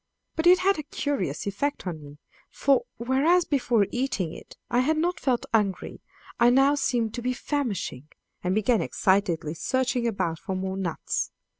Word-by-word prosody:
But 325 Hz, +1 st, +1 dB
it 365 Hz, +1 st, +8 dB
had 375 Hz, -1 st, +2 dB
a 300 Hz, -, -7 dB
curious 200 Hz, -, -2 dB
effect 205 Hz, +8 st, -2 dB
on 165 Hz, -4 st, -4 dB
me, 145 Hz, 0 st, -12 dB, 0.3 s
for, 275 Hz, -2 st, +2 dB
whereas 280 Hz, +9 st, +3 dB
before 245 Hz, -7 st, +2 dB
eating 245 Hz, -10 st, -1 dB
it -, -, -12 dB
I 240 Hz, -, +1 dB
had 305 Hz, +5 st, +2 dB
not 345 Hz, +3 st, 0 dB
felt 250 Hz, -3 st, 0 dB
hungry, 205 Hz, -4 st, 0 dB, 0.4 s
I 235 Hz, -, +6 dB
now 270 Hz, +3 st, +5 dB
seemed 240 Hz, -6 st, 0 dB
to 240 Hz, -, -4 dB
be 250 Hz, +1 st, 0 dB
famishing, 230 Hz, -, -3 dB, 0.4 s
and 180 Hz, +1 st, 0 dB
began 215 Hz, +2 st, +2 dB
excitedly 185 Hz, -5 st, +1 dB
searching 250 Hz, +6 st, 0 dB
about 170 Hz, -7 st, -1 dB
for 190 Hz, -, -4 dB
more 190 Hz, 0 st, -3 dB
nuts. 185 Hz, -4 st, -2 dB
240 Hz, 165 wpm, -26 LUFS, 190-280 Hz, 0.4 s, it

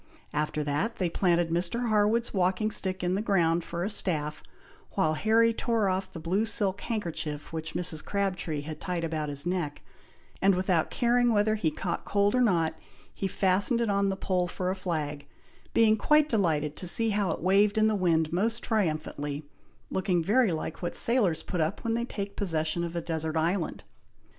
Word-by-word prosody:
After 150 Hz, 0 st, -1 dB
that, 150 Hz, +11 st, -1 dB
they 180 Hz, -3 st, -1 dB
planted 175 Hz, -2 st, +2 dB
Mr. 185 Hz, +8 st, 0 dB
Harwood's 215 Hz, +2 st, +2 dB
walking 190 Hz, +3 st, +1 dB
stick 185 Hz, -2 st, 0 dB
in 180 Hz, 0 st, +1 dB
the 195 Hz, -, 0 dB
ground, 175 Hz, -5 st, +2 dB
for 170 Hz, +1 st, -4 dB
a 200 Hz, -, -1 dB
staff, 150 Hz, -6 st, -1 dB, 0.5 s
while 155 Hz, -, +2 dB
Harry 225 Hz, +7 st, +3 dB
tore 225 Hz, -4 st, 0 dB
off 185 Hz, 0 st, -2 dB
the 165 Hz, -, -8 dB
blue 180 Hz, +6 st, 0 dB
silk 205 Hz, -3 st, 0 dB
handkerchief 165 Hz, -9 st, -4 dB
which 160 Hz, 0 st, -5 dB
Mrs. 165 Hz, -3 st, +1 dB
Crabtree 185 Hz, -6 st, -2 dB
had 155 Hz, +1 st, -8 dB
tied 180 Hz, -3 st, -2 dB
about 155 Hz, -2 st, -2 dB
his 140 Hz, +1 st, -1 dB
neck, 175 Hz, -5 st, -2 dB, 0.6 s
and 195 Hz, 0 st, +4 dB
without 180 Hz, -3 st, +1 dB
caring 240 Hz, 0 st, +2 dB
whether 215 Hz, 0 st, +3 dB
he 210 Hz, -7 st, +1 dB
caught 170 Hz, +3 st, -4 dB
cold 205 Hz, 0 st, +1 dB
or 255 Hz, -, +3 dB
not, 170 Hz, -9 st, +2 dB, 0.4 s
he 195 Hz, -, -2 dB
fastened 195 Hz, +5 st, +2 dB
it 230 Hz, -3 st, +1 dB
on 200 Hz, 0 st, +2 dB
the 190 Hz, -, -2 dB
pole 180 Hz, -2 st, 0 dB
for 180 Hz, +1 st, -2 dB
a -, -, -2 dB
flag, 150 Hz, -6 st, -3 dB, 0.4 s
being 220 Hz, -1 st, +4 dB
quite 300 Hz, +6 st, +3 dB
delighted 155 Hz, -, 0 dB
to 180 Hz, -, -5 dB
see 225 Hz, +6 st, +2 dB
how 205 Hz, -3 st, 0 dB
it 160 Hz, -, -2 dB
waved 200 Hz, +4 st, +3 dB
in 215 Hz, -, +4 dB
the 220 Hz, -, +2 dB
wind 165 Hz, -5 st, +1 dB
most 225 Hz, +6 st, +1 dB
triumphantly, 155 Hz, -7 st, -2 dB, 0.5 s
looking 185 Hz, -3 st, 0 dB
very 215 Hz, +3 st, +3 dB
like 160 Hz, 0 st, -4 dB
what 175 Hz, -, -3 dB
sailors 215 Hz, -10 st, +2 dB
put 180 Hz, -4 st, -2 dB
up 160 Hz, +6 st, -2 dB
when 230 Hz, -, 0 dB
they 235 Hz, +1 st, -1 dB
take 200 Hz, -4 st, -5 dB
possession 165 Hz, -3 st, 0 dB
of 170 Hz, 0 st, -4 dB
a 170 Hz, -, -1 dB
desert 160 Hz, -1 st, -2 dB
island. 170 Hz, +2 st, -1 dB
185 Hz, 185 wpm, -28 LUFS, 160-210 Hz, 0.6 s, and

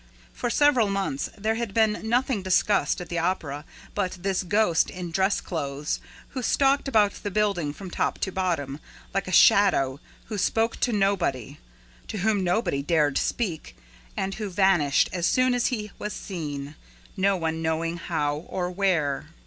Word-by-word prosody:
For 245 Hz, -, -2 dB
several 260 Hz, -5 st, +4 dB
months, 195 Hz, -8 st, -2 dB
there 215 Hz, +2 st, 0 dB
had 225 Hz, -3 st, -4 dB
been 220 Hz, 0 st, +2 dB
nothing 245 Hz, -2 st, +1 dB
discussed 190 Hz, +3 st, +2 dB
at 175 Hz, -, -8 dB
the 170 Hz, -, -1 dB
Opera 160 Hz, -4 st, -2 dB, 0.3 s
but 190 Hz, -3 st, -1 dB
this 195 Hz, -1 st, 0 dB
ghost 190 Hz, -2 st, +2 dB
in 180 Hz, -2 st, -6 dB
dress 190 Hz, +3 st, +2 dB
clothes 145 Hz, -3 st, -3 dB, 0.3 s
who 260 Hz, -, -5 dB
stalked 275 Hz, +3 st, +2 dB
about 210 Hz, -6 st, +2 dB
the 205 Hz, -, -3 dB
building, 200 Hz, -7 st, 0 dB
from 185 Hz, +4 st, -9 dB
top -, -, -1 dB
to 190 Hz, -, -1 dB
bottom, 165 Hz, -7 st, -2 dB, 0.3 s
like 195 Hz, -2 st, -1 dB
a -, -, -4 dB
shadow, 145 Hz, -10 st, +5 dB, 0.3 s
who 210 Hz, -2 st, -4 dB
spoke 225 Hz, +4 st, +1 dB
to 245 Hz, -, +1 dB
nobody, 195 Hz, -, 0 dB, 0.5 s
to -, -, -5 dB
whom 205 Hz, 0 st, +1 dB
nobody 180 Hz, -6 st, 0 dB
dared 150 Hz, -2 st, +2 dB
speak 185 Hz, -10 st, -3 dB, 0.4 s
and 195 Hz, 0 st, -1 dB
who 210 Hz, -1 st, -4 dB
vanished 180 Hz, -7 st, +3 dB
as 175 Hz, -1 st, +1 dB
soon 255 Hz, 0 st, +3 dB
as 245 Hz, -1 st, +1 dB
he 210 Hz, -5 st, -3 dB
was 210 Hz, -, -4 dB
seen, 145 Hz, -6 st, -5 dB, 0.4 s
no 195 Hz, 0 st, +2 dB
one 160 Hz, -1 st, -2 dB
knowing 165 Hz, +1 st, -1 dB
how 150 Hz, -4 st, -1 dB
or 180 Hz, -1 st, -2 dB
where. 165 Hz, -7 st, 0 dB
190 Hz, 165 wpm, -26 LUFS, 160-210 Hz, 0.5 s, shadow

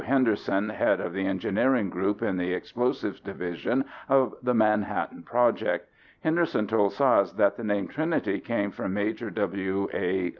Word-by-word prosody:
Henderson 110 Hz, -6 st, +1 dB
head 105 Hz, -, +2 dB
of 85 Hz, -, -4 dB
the 95 Hz, 0 st, -1 dB
Engineering 100 Hz, +3 st, +1 dB
Group 100 Hz, +3 st, -1 dB
in -, -, 0 dB
the 90 Hz, 0 st, -1 dB
Explosives 120 Hz, -1 st, -2 dB
Division 95 Hz, +7 st, -2 dB, 0.2 s
of 135 Hz, -1 st, +4 dB
the 125 Hz, 0 st, +1 dB
Manhattan 105 Hz, -2 st, +1 dB
Project. 120 Hz, -1 st, +1 dB, 0.3 s
Henderson 160 Hz, -8 st, +1 dB
told 105 Hz, -2 st, +2 dB
Szasz 130 Hz, -8 st, +3 dB
that 100 Hz, -, +4 dB
the 115 Hz, -, -7 dB
name 105 Hz, -3 st, 0 dB
Trinity 160 Hz, -, -1 dB
came 100 Hz, -4 st, -1 dB
from 95 Hz, 0 st, -4 dB
Major 110 Hz, +2 st, -2 dB
W. 100 Hz, -1 st, -1 dB
A. 90 Hz, 0 st, 0 dB
105 Hz, 150 wpm, -27 LUFS, 95-120 Hz, 0.3 s, of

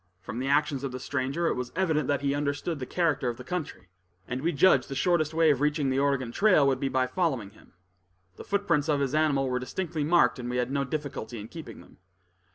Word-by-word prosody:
From 100 Hz, +6 st, -6 dB
the 130 Hz, -, -2 dB
actions 140 Hz, -1 st, +1 dB
of 135 Hz, -, -3 dB
the 130 Hz, -, -6 dB
stranger, 140 Hz, +5 st, -2 dB
it -, -, +2 dB
was 125 Hz, 0 st, -4 dB
evident 160 Hz, -6 st, +1 dB
he 140 Hz, -1 st, 0 dB
understood 145 Hz, +2 st, -2 dB
the 130 Hz, -, -5 dB
character 160 Hz, -7 st, 0 dB
of 120 Hz, -, -5 dB
the 125 Hz, -, -9 dB
country, 145 Hz, -, -5 dB, 0.4 s
and 125 Hz, +1 st, -3 dB
we 165 Hz, +4 st, +1 dB
judged 140 Hz, -4 st, +4 dB
the 135 Hz, -, -4 dB
shortest 155 Hz, 0 st, +1 dB
way 160 Hz, -1 st, +4 dB
of 140 Hz, -2 st, 0 dB
reaching 150 Hz, -2 st, +1 dB
the 130 Hz, -, +1 dB
Oregon 135 Hz, -4 st, 0 dB
trail 185 Hz, -, +4 dB
would 135 Hz, -2 st, +2 dB
be 135 Hz, -, -1 dB
by 130 Hz, -1 st, +1 dB
following 130 Hz, -, -1 dB
him. 105 Hz, -, -21 dB, 0.6 s
The -, -, -9 dB
footprints 170 Hz, -7 st, 0 dB
of 145 Hz, -2 st, +2 dB
his 140 Hz, -1 st, -1 dB
animal 150 Hz, -3 st, +2 dB
were 125 Hz, -1 st, -1 dB
distinctly 160 Hz, +4 st, -3 dB
marked, 150 Hz, -6 st, +3 dB
and 120 Hz, 0 st, -5 dB
we 125 Hz, -, -2 dB
had 125 Hz, +1 st, -1 dB
no 140 Hz, 0 st, 0 dB
difficulty 135 Hz, -5 st, -5 dB
in 105 Hz, +2 st, -9 dB
keeping 165 Hz, -2 st, -9 dB
them. -, -, -19 dB
140 Hz, 230 wpm, -27 LUFS, 130-155 Hz, 0.6 s, judged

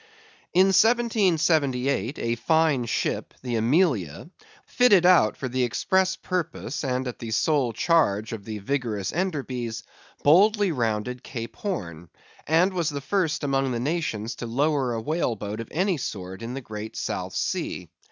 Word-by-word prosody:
In 185 Hz, +2 st, +5 dB
1778, 160 Hz, -, +2 dB
a 115 Hz, 0 st, -1 dB
fine 155 Hz, 0 st, +2 dB
ship, 115 Hz, -, -2 dB
the 125 Hz, -2 st, -2 dB
Amelia, 120 Hz, -, +1 dB, 0.3 s
fitted 205 Hz, -8 st, +4 dB
out 175 Hz, -, +5 dB
for 130 Hz, -, -3 dB
the 130 Hz, 0 st, 0 dB
express 190 Hz, +10 st, +1 dB
purpose, 165 Hz, -9 st, -4 dB
and 130 Hz, -1 st, -1 dB
at 125 Hz, -, -6 dB
the 115 Hz, -, -6 dB
sole 130 Hz, +2 st, +1 dB
charge 115 Hz, -, +1 dB
of 110 Hz, -3 st, -6 dB
the 110 Hz, +1 st, -5 dB
vigorous 105 Hz, -3 st, -2 dB
Enderbys, 130 Hz, -10 st, -3 dB, 0.4 s
boldly 200 Hz, +5 st, +5 dB
rounded 120 Hz, -1 st, -2 dB
Cape 115 Hz, -3 st, -7 dB
Horn, 85 Hz, -, -5 dB, 0.4 s
and 170 Hz, +5 st, +3 dB
was 170 Hz, -3 st, 0 dB
the 145 Hz, -2 st, -4 dB
first 165 Hz, +1 st, -1 dB
among 135 Hz, -2 st, +1 dB
the 120 Hz, -, -2 dB
nations 125 Hz, -6 st, -2 dB
to 120 Hz, -, -5 dB
lower 135 Hz, +1 st, +1 dB
a 115 Hz, -, -3 dB
whale 150 Hz, -2 st, -1 dB
boat 105 Hz, +1 st, -5 dB
of 115 Hz, -, -5 dB
any 185 Hz, +1 st, 0 dB
sort 95 Hz, -6 st, -6 dB
in 120 Hz, +2 st, -5 dB
the 135 Hz, -, -5 dB
great 110 Hz, -2 st, -7 dB
South -, -, -4 dB
Sea. -, -, -3 dB
135 Hz, 150 wpm, -25 LUFS, 115-170 Hz, 0.4 s, In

